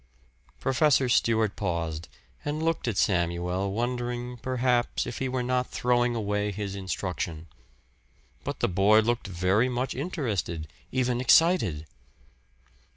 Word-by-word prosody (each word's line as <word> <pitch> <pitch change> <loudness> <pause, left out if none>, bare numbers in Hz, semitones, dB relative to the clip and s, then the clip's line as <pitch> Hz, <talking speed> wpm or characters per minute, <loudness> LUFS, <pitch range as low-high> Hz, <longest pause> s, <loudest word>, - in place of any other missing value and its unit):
Professor 135 0 +3
Stewart 110 -3 +2
paused 85 -4 -3 0.4
and 150 +2 -2
looked 165 -5 0
at 110 -5 -1
Samuel 90 +1 0
wondering, 120 +2 -3
perhaps, 125 0 0
if 120 - -5
he 130 - -1
were 125 -1 -1
not 125 0 0
throwing 120 0 +1
away 105 -1 -1
his 100 -1 -4
instruction. 90 -4 -4 1.0
But - - -5
the - - +3
boy 100 +4 +5
looked 120 -1 -1
very 95 +6 +2
much 125 +1 -2
interested, 110 - -3 0.2
even 125 -1 0
excited. 125 - +4
115 Hz, 120 wpm, -27 LUFS, 95-125 Hz, 1.0 s, boy